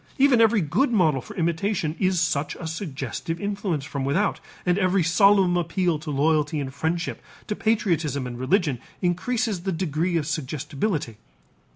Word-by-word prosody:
Even 265 -4 +5
every 225 -2 +4
good 175 - +1
model 160 - +3
for 210 - -11
imitation 170 -1 -1
is 185 -2 +2
such 155 -3 0
a 170 - -8
suggestive 160 - -4
influence 200 -8 -2
from 140 -3 -4
without 155 +10 +1 0.3
and 180 +2 +2
every 185 -1 +2
solemn 190 +1 +4
appeal 175 -1 0
to 155 0 -7
loyalty 150 +1 +1
and 135 -2 -4
friendship, 165 +4 -2 0.2
to 210 - -3
patriotism 170 - 0
and 120 -1 -6
religion, 145 - +1 0.2
increases 200 +3 0
the 190 +2 -2
degree 170 0 0
of 155 - -1
suggestibility. 150 - -3
170 Hz, 155 wpm, -24 LUFS, 150-195 Hz, 0.3 s, Even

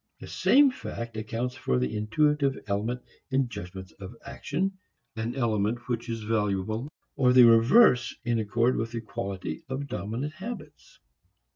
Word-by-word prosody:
The - - -9
same 280 0 +4
fact 115 - -7
accounts 115 +3 -3
for 125 - -1
the 65 0 -1
intuitive 135 +6 +1
element 110 +5 -2 0.3
in 135 -1 +1
judgments 95 -3 -8
of 100 +4 -9
action, 190 +6 -3 0.4
an 115 +2 -3
element 115 -2 0
which 120 -1 -3
is 115 -1 -3
valuable 110 +4 -1 0.2
or 125 -3 +4
the 125 -1 +8
reverse 120 - +6
in 120 -1 +1
accord 115 +4 +1
with 115 +1 -3
the 115 - -3
quality 95 -6 -5
of 135 +2 -3
dominant 125 - -4
habits. 185 -5 -9
115 Hz, 145 wpm, -27 LUFS, 105-135 Hz, 0.4 s, the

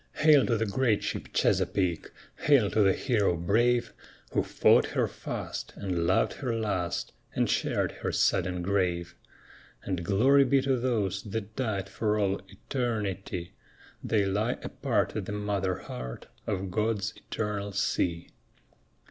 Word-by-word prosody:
Hail 155 -3 +5
to 115 - +2
the 115 - 0
great 110 0 +1
ship - - -3
Chesapeake! 90 -4 +1 0.4
Hail 135 -9 +5
to 110 - +3
the 95 -2 +5
hero 105 -7 +1
brave 120 +8 +2 0.4
Who - - +2
fought - - +4
her - - 0
fast, - - -6
and 90 -4 -1
loved 95 - +2
her 125 -4 -3
last, 100 -6 -2 0.2
and - - +2
shared - - 0
her - - -4
sudden 90 -1 +1
grave! 90 -3 0 0.7
And 90 -3 -2
glory 130 +10 +5
be 135 +1 +3
to 135 -1 +2
those 105 -6 0
that 110 +1 -5
died 110 -7 -2
for 105 +1 0
all 100 -2 0
eternity; 105 -8 -3 0.5
They 105 -3 +2
lie 105 +5 0
apart - - -1
at - - -3
the - - -3
mother 100 -3 -1
heart 60 0 -7 0.2
of 95 -3 -2
God's 105 0 0
eternal 105 -2 -3
sea. 90 -4 -1
100 Hz, 140 wpm, -28 LUFS, 95-115 Hz, 0.7 s, Hail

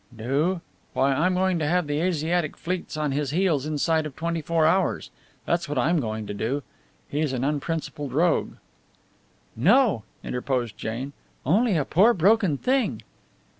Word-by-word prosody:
"Do? 145 +10 0 0.3
Why, 135 +1 +2
I'm 180 +7 +2
going 185 -1 +1
to 150 - 0
have 180 +2 +2
the 145 0 -1
Asiatic 170 -2 0
fleets 175 -2 -4
on 150 -2 0
his 140 0 -1
heels 155 -3 +1
inside 155 +1 +1
of 140 - -11
twenty 170 0 -2
four 165 +1 +1
hours! 185 +3 +1 0.3
That's 170 -3 0
what 145 - -2
I'm 160 +7 +2
going 110 -4 -3
to 105 - -5
do! 125 +8 -2 0.4
He's 145 -1 -1
an 125 -1 -2
unprincipled 145 -1 -2
rogue!" 165 +7 +1 1.0
"No," 245 - +4 0.2
interposed 125 -3 -2
Jane, 120 +7 -5 0.3
"only 200 - +3
a 145 - 0
poor 210 +9 +4
broken 195 -3 +3
thing." 260 - 0
155 Hz, 155 wpm, -25 LUFS, 140-175 Hz, 1.0 s, No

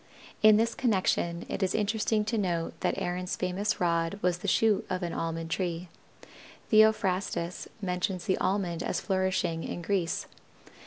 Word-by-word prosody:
In 215 -1 +7
this 230 +1 +2
connection 185 -7 0
it - - -4
is 190 - +1
interesting 215 0 +1
to 220 +2 -1
note 175 -6 -1
that - - 0
Aaron's 180 +1 -2
famous 185 +3 -1
rod 170 +1 +1
was 180 -1 +1
the 200 - -5
shoot 215 +1 +3
of 185 0 -2
an 170 - -2
Almond 165 0 -3
tree. 175 -1 -2 0.8
Theophrastus 195 -5 +2 0.2
mentions 180 0 -1
the 190 -3 +1
Almond 185 -3 0
as - - -1
flourishing 185 -4 0
in 175 - -5
Greece. 180 -2 0
185 Hz, 150 wpm, -29 LUFS, 175-205 Hz, 0.8 s, In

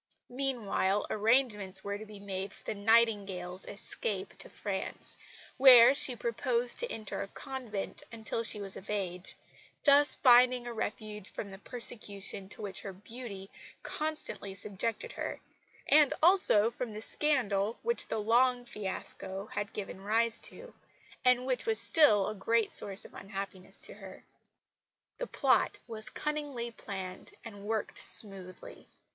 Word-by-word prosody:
Meanwhile 235 -7 0
arrangements 210 -4 +1
were 200 0 -4
to 215 - -9
be 210 -1 -11
made 195 0 -5
for - - -15
the - - -3
Nightingale's 200 -4 +1
escape 470 - -4
to - - -6
France, - - -5 0.4
where 255 -2 +9
she 265 -3 +1
proposed 240 +1 0
to 485 - -2
enter 215 -2 -4
a - - -4
convent 245 -4 -6
until 230 0 -3
she 220 -2 -3
was 195 -1 -5
of 190 - -10
age 185 -3 -3 0.5
thus 290 0 +6
finding 250 -1 +5
a 240 - -5
refuge 210 -2 -5
from 200 - -6
the 195 - -10
persecution 205 -5 -2
to 210 - -6
which 195 -2 -5
her 195 - -7
beauty 200 -1 -9 0.3
constantly 305 -10 -3
subjected 210 - -2
her, - - -5 0.5
and 300 -2 +5
also 325 - +6
from 235 -2 -5
the 215 - -6
scandal 230 -9 +1
which 470 +1 +2
the - - -2
Long 245 +3 +2
fiasco 195 -2 -4
had 205 +1 -3
given 195 -2 -7
rise 225 +3 +3
to, - - -7 0.5
and 250 0 +4
which 260 - -1
was 445 -1 +3
still 215 - +5
a - - -2
great 225 +2 +1
source 195 0 0
of - - -13
unhappiness 195 -1 -6
to - - -3
her. - - -12 1.0
The - - -3
plot - - +2
was 220 -2 -3
cunningly 290 -6 -3
planned 190 -4 -7
and 205 -3 -9
worked 220 0 -2
smoothly. 190 -3 -2
220 Hz, 145 wpm, -31 LUFS, 200-250 Hz, 1.0 s, where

